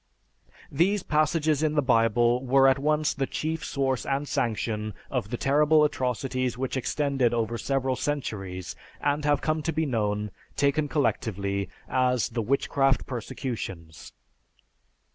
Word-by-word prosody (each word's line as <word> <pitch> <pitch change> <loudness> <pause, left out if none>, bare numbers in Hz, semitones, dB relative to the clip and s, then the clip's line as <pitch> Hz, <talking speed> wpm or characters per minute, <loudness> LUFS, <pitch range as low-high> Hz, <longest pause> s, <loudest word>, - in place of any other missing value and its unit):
These 185 +7 +2
passages 155 0 +1
in 155 -1 +1
the 150 - +4
Bible 120 0 +3
were 135 +1 +5
at 135 0 +4
once 150 +2 +1
the 135 -1 -2
chief 160 +1 -3
source 135 -2 -1
and 140 +1 -1
sanction 110 -3 -2 0.2
of 100 - -2
the 120 - -3
terrible 150 +3 +4
atrocities 130 -3 -1
which 130 +1 -2
extended 135 -2 0
over 115 0 -1
several 135 -1 0
centuries 95 - -4 0.2
and 145 +1 0
have 145 -1 +2
come 155 0 0
to 165 - -1
be 160 +1 0
known, 105 -5 -1 0.2
taken 145 +2 +2
collectively, 100 - -1 0.2
as 125 -3 +1
the 115 -1 -2
"Witchcraft 135 +2 +1
Persecutions." 105 - -6
130 Hz, 135 wpm, -27 LUFS, 115-145 Hz, 0.2 s, were